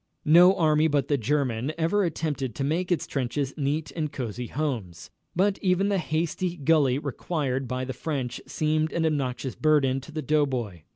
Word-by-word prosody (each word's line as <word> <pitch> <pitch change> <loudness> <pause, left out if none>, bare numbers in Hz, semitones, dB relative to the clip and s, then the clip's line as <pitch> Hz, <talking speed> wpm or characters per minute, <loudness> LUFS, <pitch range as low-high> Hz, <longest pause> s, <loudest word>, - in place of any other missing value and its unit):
No 175 +5 +7
army 155 -2 +3
but 145 -3 0
the 145 - +3
German 130 +1 0
ever 170 +5 +2
attempted 150 - -2
to 135 - -2
make 170 +6 -1
its 170 - +1
trenches 135 +1 -2
neat 150 +2 -2
and 155 -3 -3
cosey 120 -1 -4
homes, 115 - -4 0.2
but 195 +3 +2
even 190 +1 +2
the 200 -2 +1
hasty 170 +2 -2
gully 145 -4 +3
required 140 -2 -2
by 130 +1 -2
the 130 - -4
French 130 -3 -4
seemed 155 0 0
an 165 -1 0
obnoxious 135 -4 -1
burden 140 -4 +2
to 145 - -12
the 155 0 -4
doughboy. 130 - 0
150 Hz, 170 wpm, -26 LUFS, 130-160 Hz, 0.2 s, No